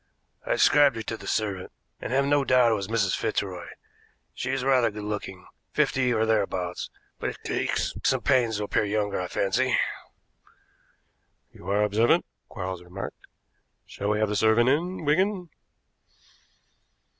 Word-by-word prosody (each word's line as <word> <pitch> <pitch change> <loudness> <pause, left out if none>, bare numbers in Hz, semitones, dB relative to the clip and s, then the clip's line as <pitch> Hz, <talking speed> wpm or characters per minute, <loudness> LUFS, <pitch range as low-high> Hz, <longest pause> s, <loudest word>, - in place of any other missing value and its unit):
"I - - 0
described 145 -4 +5
her 110 - -4
to 110 - -4
the - - -10
servant, 100 -4 -2 0.3
and - - -5
have 135 +2 +2
no 145 0 +3
doubt 125 -3 +4
it - - +3
was 100 -3 -2
Mrs. 110 -4 +1
Fitzroy. 95 -5 -2 0.7
She 130 - -4
is 135 -1 -1
rather 130 -3 +3
good 105 0 -7
looking, 100 -3 -5 0.3
fifty 130 -2 +2
or 110 -1 +2
thereabouts, 95 -5 -1 0.3
but - - -3
takes - - -1
some - - +2
pains 120 -4 +2
to 105 - -2
appear 105 - +1
younger, 105 -2 -1
I 90 - -3
fancy." 95 +2 +1 1.7
"You - - -10
are 100 +1 +2
observant," 110 +10 +3 0.2
Quarles 95 -3 -5
remarked. 90 +3 -8 0.6
"Shall 100 - -4
we 105 - +2
have 110 -1 +1
the 105 - -1
servant 110 +3 +4
in, 165 +4 -1
Wigan?" 185 +4 +1
110 Hz, 150 wpm, -26 LUFS, 100-130 Hz, 1.7 s, described